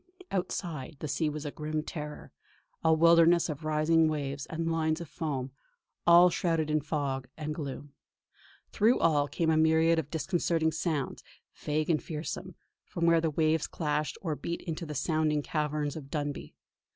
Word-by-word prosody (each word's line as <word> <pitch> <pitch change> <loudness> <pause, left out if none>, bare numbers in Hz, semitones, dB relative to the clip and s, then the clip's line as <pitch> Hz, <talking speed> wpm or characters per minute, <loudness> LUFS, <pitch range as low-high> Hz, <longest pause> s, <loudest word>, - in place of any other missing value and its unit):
Outside, 165 -6 -3
the 155 - -5
sea 155 +2 0
was 150 0 -5
a 145 - -3
grim 155 +1 -3
terror, 150 -2 -7 0.5
a 160 - +4
wildness 170 +1 +5
of 155 0 -5
rising 155 +1 +3
waves 140 -2 -3
and 165 0 -2
lines 160 -1 0
of 170 - -7
foam, 140 -4 -4 0.6
all 175 +1 +8
shrouded 165 -3 0
in 155 0 +2
fog 140 -3 -2
and 155 -1 -3
gloom. 145 -2 -6 0.8
Through 225 +4 +3
all 150 -3 +3
came 160 +2 0
a 160 - +3
myriad 160 +1 +4
of 145 -3 -4
disconcerting 165 0 0
sounds, 160 -3 -2 0.3
vague 155 +2 -1
and 155 - +1
fearsome, 165 +2 -5 0.3
from 170 -1 -3
where 170 -1 +5
the 165 - +1
waves 155 0 +1
clashed 150 -2 -2
or 160 -4 -1
beat 170 +4 -4
into 170 -1 -4
the 150 - -5
sounding 155 0 +1
caverns 150 -1 -2
of 145 -4 -8
Dunbuy. 145 0 -4
155 Hz, 165 wpm, -30 LUFS, 150-165 Hz, 0.8 s, all